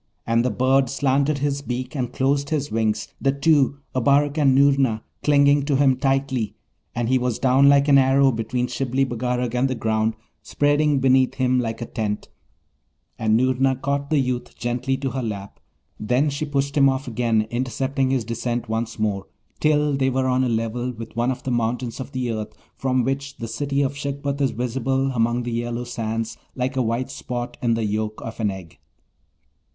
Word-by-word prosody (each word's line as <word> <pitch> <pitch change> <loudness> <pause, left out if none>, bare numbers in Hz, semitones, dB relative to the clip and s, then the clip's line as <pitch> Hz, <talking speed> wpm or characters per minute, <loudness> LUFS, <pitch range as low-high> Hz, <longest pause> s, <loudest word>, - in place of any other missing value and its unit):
and 115 +1 +2
the 125 - +1
bird 130 +3 +2
slanted 140 +2 +1
his 140 0 -1
beak 125 0 -4
and 125 -4 -2
closed 140 +1 0
his 150 -3 -1
wings, 110 -1 0
the 135 - +3
two, 140 -1 +2 0.2
Abarak 140 +3 +2
and 135 -3 +4
Noorna, 135 -5 +3 0.2
clinging 145 0 +4
to 145 -1 +1
him 135 -1 +4
tightly; 135 -4 0 0.4
and 120 -1 -1
he 130 +1 +3
was 125 -2 -1
down 135 +1 +4
like 140 0 +5
an 140 -1 +6
arrow 135 +1 +4
between 120 +2 -2
Shibli 135 +1 0
Bagarag 125 0 -2
and 125 +2 +2
the 130 - -1
ground, 110 -1 0 0.3
spreading 145 0 +2
beneath 130 -1 +3
him 130 -1 +2
like 115 -1 -3
a - - -4
tent, 105 -3 -3 0.9
and 110 0 +3
Noorna 130 +1 +2
caught 140 +2 -2
the 155 - +2
youth 125 -2 -2
gently 125 +2 -1
to 135 -1 -3
her 135 - -3
lap; 100 -4 -6 0.4
then 125 +7 +1
she 140 +2 -3
pushed 140 -1 -1
him 135 -2 +5
off 135 +1 -2
again, 115 -2 +1
intercepting 130 +2 -1
his 130 -4 0
descent 120 +1 -3
once 115 +1 -3
more, 100 -3 -1 0.3
till 150 -1 +2
they 135 -1 +1
were 130 0 0
on 130 0 +2
a 125 - +1
level 115 +2 -1
with 115 -1 -9
one 120 +2 +1
of 130 - -3
the 130 - -2
mountains 120 +1 -1
of 130 - -6
the 125 -2 -2
earth, 110 -1 -5 0.2
from 130 -1 0
which 140 +2 -3
the 115 - -5
City 140 +3 -1
of 135 +1 -2
Shagpat 140 0 -3
is 135 - +3
visible 130 +3 -1
among 120 0 +1
the 120 - -4
yellow 120 +1 -2
sands 115 -1 -4 0.2
like 130 +1 -2
a 130 - +1
white 115 +2 -1
spot 120 -1 -5
in 115 -2 +2
the 115 -1 -1
yolk 110 +1 -2
of 115 0 -7
an 105 -2 +1
egg. 95 -5 -9
130 Hz, 190 wpm, -23 LUFS, 115-140 Hz, 0.9 s, an